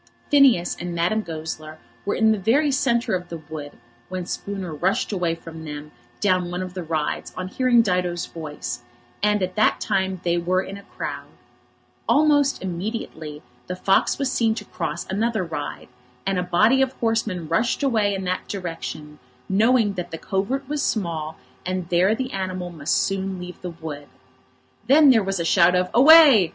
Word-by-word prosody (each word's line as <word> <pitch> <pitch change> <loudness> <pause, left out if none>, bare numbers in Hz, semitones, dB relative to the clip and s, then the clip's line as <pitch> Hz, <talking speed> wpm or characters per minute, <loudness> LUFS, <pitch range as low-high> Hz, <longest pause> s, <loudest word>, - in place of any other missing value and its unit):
Phineas 265 -12 +5
and 175 0 -4
Madame 175 +6 +1
Goesler 155 -3 -6 0.3
were - - +1
in 220 0 +4
the 215 - +1
very 275 +9 +2
centre 240 -5 +1
of 180 -1 -2
the 170 - -5
wood 155 -2 -8 0.4
when 185 -1 -4
Spooner 190 -3 -5
rushed 190 - 0
away 175 -4 0
from 165 -1 -10
them 150 -1 -7 0.3
down 185 -3 +1
one 180 +1 -3
of 185 -1 -7
the 185 - -4
rides 155 -2 -2
on 185 0 -4
hearing 245 +1 +3
Dido's 180 -3 0
voice; 150 -6 -6 0.4
and 210 -1 +2
at 185 0 -2
that 215 - +3
time 190 -1 -1
they 175 0 +1
were 185 +2 +1
in 195 - -7
a 200 - -9 0.2
crowd. - - -4 0.8
Almost 290 -4 +3
immediately 170 -5 -5 0.2
the 180 - -3
fox 195 +1 +2
was 275 -2 -1
seen 225 -3 +1
to 210 - -6
cross 160 -2 -4
another 220 +1 -1
ride, 160 -4 -5 0.4
and 195 -1 0
a - - +1
body 215 +9 +3
of 265 0 +1
horsemen 225 -8 -1
rushed 225 - 0
away 215 -7 +2
in 195 - -4
that 185 0 -2
direction, 165 -5 -6 0.3
knowing 220 +1 +3
that 180 -2 -5
the 165 - -6
covert 240 +11 -2
was 295 0 -2
small, 160 -6 -2 0.3
and 185 -1 -3
there 185 +5 +3
the 260 +2 -4
animal 185 -2 -3
must 155 -2 -1
soon 195 -1 -1
leave 180 0 -9
the 180 - -5
wood. 155 -4 -8 0.8
Then 285 +1 +7
there 225 -3 +4
was 195 -1 -2
a 170 - -1
shout 175 0 +5
of 180 0 +1
"Away!" 275 - +8
185 Hz, 175 wpm, -23 LUFS, 170-220 Hz, 0.8 s, Away